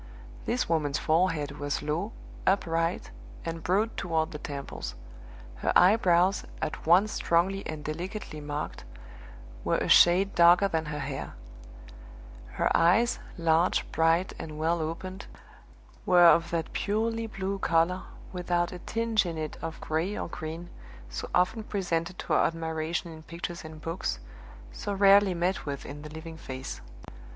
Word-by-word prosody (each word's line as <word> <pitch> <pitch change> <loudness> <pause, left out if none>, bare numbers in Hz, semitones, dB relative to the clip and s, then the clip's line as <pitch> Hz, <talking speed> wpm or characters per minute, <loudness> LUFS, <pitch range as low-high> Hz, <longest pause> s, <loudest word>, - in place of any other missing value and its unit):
This 125 - 0
woman's 150 -3 +1
forehead 155 -3 +1
was 145 0 -2
low, 160 +8 -2 0.4
upright, 165 -3 +1 0.3
and 165 0 -4
broad 205 +7 +1
toward 165 -3 -1
the 150 - -6
temples; 140 -2 -6 0.6
her - - 0
eyebrows, 185 -1 +5 0.2
at 155 0 -4
once 190 +6 +5
strongly 185 +4 +1
and 155 -1 -6
delicately 170 +1 -5
marked, 145 0 -5 0.8
were - - +1
a - - -1
shade 185 +3 +6
darker 175 +3 +6
than 160 -4 -1
her 150 0 -4
hair; 145 - -5 1.2
her - - +1
eyes, 220 +8 +4 0.2
large, 165 +1 +2
bright, 165 +3 +2
and 155 -1 -7
well 165 +2 +1
opened, 185 +5 -5 0.8
were 175 -1 +7
of 170 0 +6
that 165 -1 -2
purely 225 +2 -1
blue 195 -1 -3
color, 170 +2 +2 0.3
without 175 -1 0
a 180 - -7
tinge 225 +2 0
in 170 -3 -4
it 155 -1 -4
of 165 0 -5
gray 165 +6 -1
or - - -3
green, 165 +2 -7 0.4
so 60 - -5
often 180 +6 +2
presented 175 -4 -2
to - - -3
our - - +4
admiration 165 +1 -3
in 160 -1 -10
pictures 170 +2 -6
and 155 -1 -10
books, 165 - -2 0.5
so 200 - -4
rarely 200 -1 +5
met 175 0 -1
with 140 -1 -4
in 145 +1 -8
the 150 - -8
living 160 +1 -8
face. 130 - -7
170 Hz, 145 wpm, -28 LUFS, 160-185 Hz, 1.2 s, were